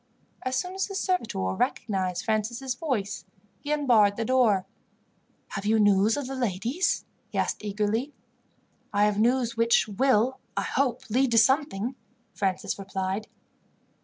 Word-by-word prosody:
As 255 0 -2
soon 360 +8 -2
as 385 0 -1
the 395 - -7
servitor 230 - -1
recognized 185 - -1
Francis' 235 +4 -1
voice, 250 -8 -3 0.4
he 295 - -5
unbarred 235 -9 +4
the 230 - -2
door. 220 -7 +3 0.8
"Have 195 - -5
you 220 +1 +4
news 205 +2 +4
of 285 - -3
the 270 - -5
ladies?" 245 - -1 0.2
he - - -6
asked - - -1
eagerly. 210 +6 -1 0.8
"I 205 +1 +3
have 210 -1 +1
news 240 +1 +2
which 230 0 +3
will, 250 +3 +2 0.2
I - - +1
hope, 255 -3 -1
lead 260 +3 +3
to - - +4
something," 260 -2 +2 0.4
Francis 190 0 -2
replied. 195 +1 -3
225 Hz, 140 wpm, -27 LUFS, 205-260 Hz, 0.8 s, unbarred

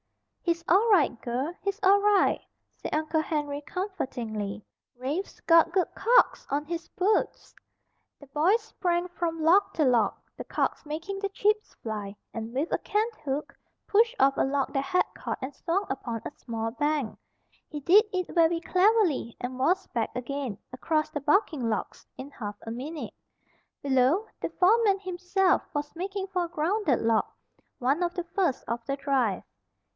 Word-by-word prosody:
"He's 340 -1 -1
all 400 +7 +4
right, 290 - +3
girl, 255 +7 -2
he's 395 +1 -2
all 400 +1 +6
right," 410 -1 +3 0.3
said - - -6
Uncle 310 +1 +1
Henry 295 -2 -2
comfortingly. 235 - -4 0.3
"Rafe's 285 +10 -4
got 330 0 +5
good 365 0 +2
calks - - +3
on 290 +2 -1
his 335 +1 -5
boots." 400 +4 0 0.6
The 285 - -13
boy 310 +10 +3
sprang 360 -6 -2
from 335 -2 -3
log 370 +6 +5
to 310 - +2
log, 235 -5 +3 0.2
the - - -6
calks - - -2
making 330 +6 -4
the 400 0 -2
chips 420 +2 0
fly, 210 -3 -5 0.2
and 225 0 -5
with 275 +7 -2
a - - +1
canthook 405 - -2 0.3
pushed 455 +4 +3
off 275 0 +5
a - - +3
log 275 0 0
that 275 - +1
had 365 +5 +2
caught - - -4
and 265 +2 -5
swung 365 +7 -1
upon 235 -4 -4
a - - -4
small 225 -4 -4
bank. 290 -2 -1 0.5
He 300 - -5
did 365 +9 +6
it 365 -2 -2
very 335 -1 +4
cleverly, 365 - +2
and 255 +1 -5
was 365 +8 +2
back 230 -2 -1
again, 255 -3 -3 0.2
across 310 +4 0
the 295 - -3
bucking 295 - +2
logs, 215 - -4
in 270 +2 -8
half 205 -6 -6
a 225 - -6
minute. 290 +7 -6 0.7
Below, 275 - +3
the - - -2
foreman 400 +1 +3
himself 370 0 +1
was 290 +1 -3
making 385 +2 -3
for 365 -2 -1
a - - -9
grounded 335 - +1
log, 225 -1 +3 0.5
one 275 +7 +1
of 350 0 -1
the 355 - -2
first 360 -10 +1
of 235 0 -3
the 275 0 -2
drive. 270 -8 0
315 Hz, 165 wpm, -27 LUFS, 265-375 Hz, 0.7 s, all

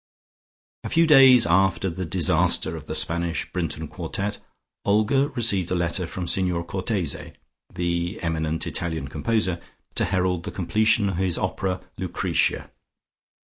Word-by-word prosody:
A - - -4
few 165 +1 +4
days 135 -6 +7
after 95 +2 +2
the 90 0 -4
disaster 85 -2 +1
of 80 -1 -9
the 80 - -4
Spanish 85 +1 -1
Brinton - - -3
Quartet, 100 +1 -4 0.4
Olga 110 +7 +2
received 100 -7 +1
a 90 - 0
letter 85 +1 0
from 90 +1 -5
Signor 90 -1 0
Cortese, 95 -2 -3 0.4
the 85 0 -2
eminent 80 -1 -1
Italian 80 -5 -2
composer, 90 +3 -1 0.3
to - - +2
herald 90 -2 0
the - - -4
completion 105 +3 +2
of 95 -3 -2
his 95 -2 0
opera, 95 0 -2 0.2
"Lucretia." - - -1
90 Hz, 135 wpm, -24 LUFS, 85-100 Hz, 0.4 s, days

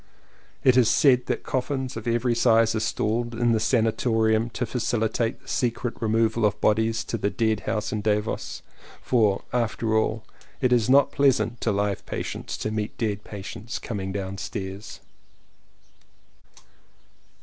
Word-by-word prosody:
It 130 -1 +5
is 120 -3 +5
said 125 -4 +4
that - - -2
coffins 130 0 -2
of 115 +1 -6
every 120 +1 +1
size 115 -1 +4
are 110 - 0
stored 115 +2 -1
in 120 +1 +2
the 110 - +2
sanatorium 110 -1 +2
to 125 - -3
facihtate 115 -1 -1
the - - -23
secret 120 -1 -1
removal 115 0 +1
of 105 -1 +2
bodies 110 +1 +2
to - - -4
the 100 - +1
dead 110 -1 0
house 110 -1 -1
in 105 - -2
Davos. 105 0 -2 0.4
For, 110 -6 +2
after 115 -2 0
all, 110 0 0 0.4
it 125 -2 +2
is 120 -1 +2
not 140 +1 +5
pleasant 130 -4 +2
to 115 - +1
live 100 0 -1
patients - - -4
to 110 - -3
meet 110 -1 -3
dead 105 -3 -2
patients 105 +3 -7
coming 95 -4 -4
down 95 -1 -4
stairs! 95 +2 -6
110 Hz, 150 wpm, -25 LUFS, 105-120 Hz, 0.4 s, It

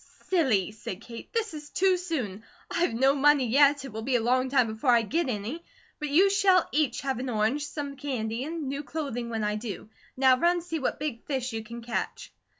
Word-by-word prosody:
"Silly," 255 - +2
said 210 -3 -7
Kate. 230 -1 -10
"This 445 -5 -1
is 300 -1 -8
too 380 0 +3
soon. 265 - -3 0.3
I've 340 -9 +1
no 265 +3 +4
money 285 -1 +4
yet, 280 +3 +4
it 270 - -8
will 220 - -4
be 255 +3 0
a - - +4
long 255 +3 +1
time 255 -2 +4
before 220 +4 -2
I 235 -2 +5
get 315 +6 0
any; 235 +9 -4 0.4
but 300 -1 -3
you 370 +7 +5
shall 385 -3 +4
each 290 -5 +1
have 265 -3 -2
an 260 +1 -3
orange, 235 +6 0
some 285 -2 -5
candy, 245 -4 -3
and 315 -1 -4
new 280 +2 -3
clothing 280 -6 -4
when 225 -2 -2
I 210 0 0
do. 215 -1 -7 0.3
Now 260 -1 +5
run 345 +2 +3
see 330 -2 -3
what 275 - -2
big 280 -6 -4
fish 260 -4 -2
you 225 0 -3
can 235 +2 -9
catch." 235 0 -4
265 Hz, 215 wpm, -27 LUFS, 230-300 Hz, 0.4 s, I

